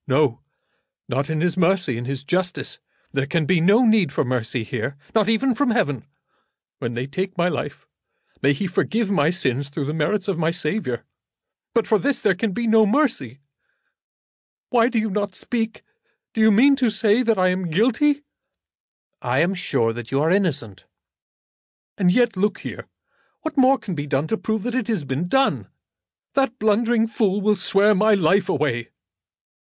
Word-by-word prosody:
"No; 135 -2 +1 0.7
not 135 +4 -2
in 155 -1 -1
His 175 -1 +1
mercy; 180 -6 +1
in 120 +1 -5
His 135 +1 -4
justice. 180 +4 -2 0.3
There 135 0 -1
can 160 +1 0
be 175 +1 +2
no 210 +8 +5
need 215 -9 +3
for 145 - -1
mercy 125 -1 -2
here, 125 +5 -4 0.2
not 220 -1 +2
even 250 +4 +2
from 275 +3 0
Heaven. 145 - 0 0.7
When 115 0 -4
they 120 +2 -3
take 190 +8 -4
my 175 0 +2
life - - -5 0.6
may 140 - +3
He 145 - -3
forgive 205 +4 -1
my 150 -5 +3
sins 140 -6 -1
through 140 0 -4
the 150 - -3
merits 180 +6 -1
of 190 -4 -1
my 160 0 +1
Saviour. 170 +5 -3 0.7
But 230 - +2
for 215 - +2
this 280 +3 0
there 210 -3 +2
can 200 +4 -2
be 235 +5 -2
no 220 -1 +4
mercy. 200 - 0 1.3
Why 240 -1 +4
do 245 - -2
you 220 -1 0
not 205 -1 -2
speak? 225 -2 -3 0.5
Do 220 - -1
you 220 - +6
mean 260 +7 +5
to 255 -4 +2
say 220 +1 +2
that 225 -4 +1
I 185 0 +3
am 180 -1 -2
guilty?" 260 - +2 1.0
"I 125 0 -1
am 175 +4 +1
sure 115 -11 -1
that 120 0 -8
you 135 - 0
are 155 +3 +2
innocent." 150 - -1 1.1
"And 180 -2 +4
yet, 240 +1 +2
look 200 +2 -1
here. - - -8 0.5
What 315 -2 -5
more 270 0 +5
can 195 - -6
be 145 -2 -4
done 140 +1 0
to 220 - 0
prove 220 -1 -3
it 245 - -1
than 255 -3 -1
has 215 -9 -1
been 140 +5 -3
done? 270 +8 +1 0.7
That 270 -3 0
blundering 225 +1 +2
fool 210 -3 0
will 210 +1 +2
swear 200 +2 +3
my 210 +2 +4
life 190 +1 +2
away." 120 -9 -1
190 Hz, 180 wpm, -22 LUFS, 145-225 Hz, 1.3 s, you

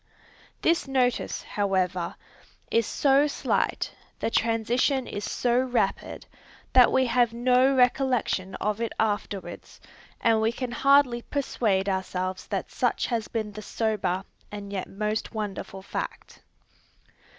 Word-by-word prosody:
This 335 -3 +2
notice, 255 -3 0
however, 185 -4 -1 0.6
is 230 -2 +2
so 280 +1 +3
slight, 290 - -1 0.3
the - - -1
transition 235 +4 +1
is 205 - -5
so 245 +2 +1
rapid, 255 -1 -1 0.5
that 250 -2 +7
we 260 - +3
have 240 -1 +2
no 255 +2 +4
recollection 250 -7 +1
of 210 +1 -2
it 230 - -1
afterwards, 205 -2 -3 0.4
and 225 -2 +3
we 220 +1 +2
can 250 0 -4
hardly 270 -1 +4
persuade 220 -8 0
ourselves 190 -1 -2
that - - -3
such - - 0
has 230 -3 -2
been 215 -2 -3
the 215 +1 -8
sober 205 -5 -1 0.3
and 205 -1 -7
yet 190 - -3
most 210 +3 -3
wonderful 195 -2 -5
fact. - - -6
225 Hz, 125 wpm, -26 LUFS, 200-250 Hz, 0.6 s, that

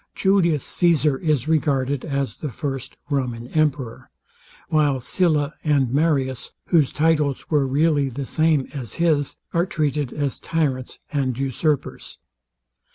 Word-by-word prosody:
Julius 175 -7 +2
Caesar 155 -5 +2
is 155 -5 0
regarded 140 -4 +1
as 140 -3 -2
the 150 - -4
first 135 +1 -5
Roman 125 -4 -1
emperor; 145 -6 -1 0.6
while 145 -4 +2
Sylla 150 +2 +1
and 140 -5 +2
Marius, 140 -4 +1 0.2
whose 155 -6 +4
titles 150 -3 +1
were 145 -3 +3
really 145 0 +2
the 135 +2 -5
same 155 -1 +2
as 130 -6 -6
his, 155 -5 +1 0.2
are 170 +2 +2
treated 145 -5 -1
as 145 -3 -2
tyrants 140 -6 -2 0.2
and 130 -4 0
usurpers. 135 +2 -2
145 Hz, 125 wpm, -22 LUFS, 135-155 Hz, 0.6 s, whose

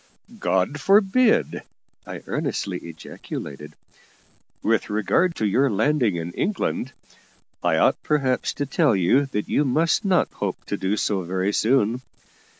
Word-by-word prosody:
"God 95 +11 0
forbid!" 210 +6 +3 0.5
I - - -7
earnestly - - -3
ejaculated. 75 -3 -8 0.9
"With 115 0 +1
regard 110 - +1
to 110 - -1
your 130 +7 +2
landing 115 -1 +1
in 85 0 -4
England, 175 - -2 0.7
I - - +2
ought - - +2
perhaps 135 -4 0
to 145 - -2
tell 145 - +2
you 110 +10 +3
that 105 -6 -3
you 145 - +2
must 155 +5 +1
not 190 -3 +2
hope - - -4
to - - -3
do 95 +3 -1
so 100 -1 0
very 95 +3 -1
soon. 120 +1 +2
125 Hz, 135 wpm, -23 LUFS, 95-150 Hz, 0.9 s, forbid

